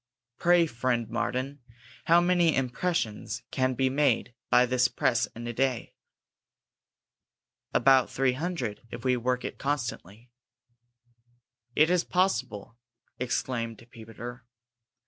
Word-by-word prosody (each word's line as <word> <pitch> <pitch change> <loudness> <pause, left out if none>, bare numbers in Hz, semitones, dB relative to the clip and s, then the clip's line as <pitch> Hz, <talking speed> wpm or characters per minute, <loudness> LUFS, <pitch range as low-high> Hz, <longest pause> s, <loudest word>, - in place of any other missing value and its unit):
"Pray, 175 -1 +5
friend 120 -4 -1
Martin, 130 +5 -2 0.5
how 170 +1 +6
many 175 -2 +3
impressions 120 - -2
can 130 -1 0
be 130 +2 +2
made 130 -3 +1 0.2
by 125 - +5
this 125 0 +2
press 120 -1 +1
in 120 +1 -7
a 120 - -4
day?" 130 0 -1 1.8
"About 130 0 +4
three 135 -1 +1
hundred, 140 - -3
if - - -8
we 130 -1 +3
work 125 +1 -1
it - - -6
constantly." 120 -5 -4 1.4
"Is 170 +3 +4
it - - -16
possible!" 120 - -1 0.4
exclaimed 120 -2 -3
Peter. 115 +2 -9
125 Hz, 110 wpm, -28 LUFS, 115-145 Hz, 1.8 s, how